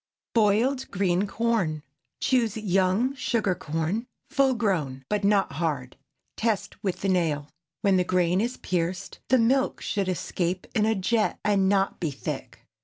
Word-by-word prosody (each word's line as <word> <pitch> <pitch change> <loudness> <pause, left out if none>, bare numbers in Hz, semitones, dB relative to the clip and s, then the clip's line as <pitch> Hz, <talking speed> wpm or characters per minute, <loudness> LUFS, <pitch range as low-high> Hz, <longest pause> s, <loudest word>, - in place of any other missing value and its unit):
BOILED 235 +5 +2
GREEN 190 0 +1
CORN. 195 -9 0 0.4
Choose 230 -5 +2
young 195 +4 +2
sugar 230 -7 0
corn, 175 +6 -2 0.2
full 275 -3 +3
grown, 155 - -1
but 210 -1 0
not 200 -3 +3
hard; 140 -4 -2 0.4
test 215 -2 -2
with 190 -3 -2
the 195 - 0
nail. 160 -6 +1 0.3
When 195 -2 +4
the 180 - +3
grain 180 +1 +2
is 240 +3 -2
pierced, 180 +2 -3
the 260 - +5
milk 260 +3 +2
should 200 -4 -2
escape 180 0 -2
in 215 -2 +2
a 220 - +2
jet, 215 +3 +1
and 195 -2 +3
not 195 -1 +1
be 165 - -1
thick. 140 - -6
195 Hz, 150 wpm, -26 LUFS, 175-225 Hz, 0.4 s, the